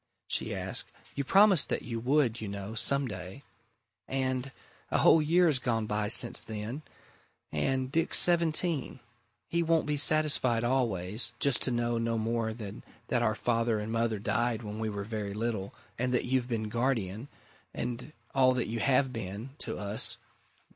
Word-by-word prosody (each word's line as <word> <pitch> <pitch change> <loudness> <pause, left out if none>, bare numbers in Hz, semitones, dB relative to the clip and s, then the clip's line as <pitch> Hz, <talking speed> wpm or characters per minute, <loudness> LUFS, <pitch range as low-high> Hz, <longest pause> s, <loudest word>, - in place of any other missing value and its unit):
she - - -2
asked. - - -3 0.2
"You 140 - -3
promised 195 +2 +5
that - - -2
you 115 -2 -5
would, 125 -2 +1
you 110 - -5
know, 100 +1 -6
some 140 +4 +1
day. 95 +5 -8 0.6
And 130 0 -2 0.4
a - - +1
whole 160 - +5
year's 160 -2 +3
gone 115 -3 -1
by 105 0 -2
since 120 +2 +2
then. 110 +6 -6 0.7
And 130 -1 -1
Dick's 165 +3 +4
seventeen! 170 -4 +4 0.5
He 170 - 0
won't 165 -1 +1
be 150 0 -1
satisfied 145 -6 +3
always 115 -3 -1
just 140 -4 +3
to - - -1
know 120 -1 -1
no 115 0 -1
more 115 0 -1
than 110 -2 -8 0.3
that 120 - +1
our 110 -2 +1
father 115 -1 0
and 105 +1 -5
mother 115 -1 0
died 120 +3 -1
when 105 0 -6
we 110 -1 -2
were 100 -1 -5
very 105 -2 -5
little, 110 -3 -3 0.3
and 125 +1 0
that - - 0
you've 125 -1 -1
been 110 -2 -2
guardian 115 -2 -2 0.4
and 125 +4 -5 0.2
all 130 -1 +4
that 125 - -1
you 115 +2 -4
have 130 +1 +2
been! 105 +3 -6
to 110 - -5
us. 105 +1 +3
120 Hz, 165 wpm, -29 LUFS, 110-135 Hz, 0.7 s, promised